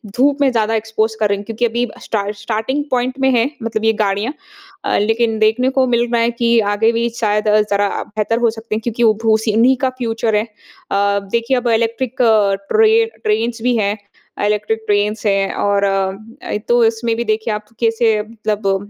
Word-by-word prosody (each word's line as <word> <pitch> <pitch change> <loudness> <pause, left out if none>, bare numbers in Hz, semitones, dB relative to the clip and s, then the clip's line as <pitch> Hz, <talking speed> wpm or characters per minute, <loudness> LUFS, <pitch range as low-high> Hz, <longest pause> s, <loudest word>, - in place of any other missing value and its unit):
धूप 280 +3 +2
में 270 - +4
ज़्यादा 225 -2 0
एक्सपोज़ 220 0 -1
कर 210 -2 +2
रहे 200 - +1
हैं 205 - -9
क्योंकि 225 +2 -1
अभी 240 +1 -1 0.2
स्टार्ट 205 -1 -2
स्टार्टिंग 225 +7 -2
पॉइंट 255 +1 -1
में 265 0 +3
है 235 +4 +2
मतलब 225 -1 -2
ये 225 - +4
गाड़ियाँ 205 +6 -1 0.5
अ, - - +1
लेकिन 225 +1 +1
देखने 220 +4 +2
को 260 - +3
मिल 240 0 +2
रहा 235 - +2
है 235 +1 +2
कि 235 0 +2
आगे 225 +2 +2
भी 235 +1 0
शायद 210 -1 +1 0.2
ज़रा 200 0 +2
बेहतर 215 +2 -2
हो 235 -1 +3
सकते 220 -1 -4
हैं 220 - -3
क्योंकि 235 +1 -2
वो 220 -2 +5
भो 220 -1 +4
सी 220 0 -1
इन्हीं 235 +5 +4
का 260 - +2
फ्यूचर 225 -2 -1
है। 210 - +2 0.5
अ, 200 0 +2
देखिए 235 +3 +1
अब 245 0 -2
इलेक्ट्रिक 230 +2 0 0.6
ट्रे 445 +1 +4 0.2
ट्रेन्स 225 +2 -1
भी 245 +1 +1
हैं 205 0 0 0.4
अ, - - -1
इलेक्ट्रिक 210 +1 0
ट्रेन्स 210 +1 0
हैं 195 -1 +1
और 200 0 0
अ 195 -1 +1 0.4
अ, - - -1
तो 240 0 +4
इसमें 225 0 0
भी 235 - -2
देखिए 220 0 -1
आप 210 0 -5
कैसे 225 -2 +2
मतलब 210 -2 -3
225 Hz, 200 wpm, -17 LUFS, 210-235 Hz, 0.6 s, वो